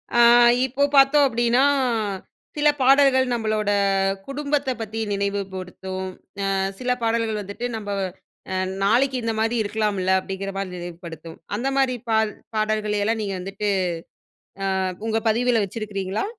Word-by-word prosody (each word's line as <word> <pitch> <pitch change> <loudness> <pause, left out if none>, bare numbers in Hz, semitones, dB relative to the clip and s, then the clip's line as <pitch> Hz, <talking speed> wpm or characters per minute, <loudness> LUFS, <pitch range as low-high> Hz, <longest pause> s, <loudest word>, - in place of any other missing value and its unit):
அ, - - +4 0.5
இப்போ 265 +2 -1
பாத்தோம் 275 +1 +6
அப்டின்னா, 240 +1 +2 0.9
சில 300 0 +2
பாடல்கள் 265 0 +5
நம்மளோட 215 -3 0 0.6
குடும்பத்த 285 0 -1
பத்தி 220 0 -5
நினைவுப்படுத்தும், 190 -1 -4 0.4
அ - - +1 0.3
சில 250 0 -1
பாடல்கள் 225 -1 0
வந்துட்டு, 200 +4 -6
நம்ப 205 -2 -5 0.6
அ - - -1 0.3
நாளைக்கு 250 +6 +3
இந்த 225 0 0
மாரி 225 +2 +1
இருக்கலாம்ல 205 -3 -1
அப்டிங்கற 195 +1 -5
மாரி 195 -1 -3
நினைவுப்படுத்தும் 170 -2 -8 0.2
அந்த 240 +6 -2
மாரி 265 -2 +2
பால் 220 -1 +2 0.2
பாடல்களைய் 215 -1 0
எல்லாம் 225 +2 0
நீங்க 200 -2 -3
வந்துட்டு 195 +3 -4 1.2
அ, - - 0 0.2
உங்க 225 0 +1
பதிவில்ல 235 +1 +2
வச்சிருக்கீங்களா? 200 -1 -3
215 Hz, 125 wpm, -23 LUFS, 195-245 Hz, 1.2 s, பாத்தோம்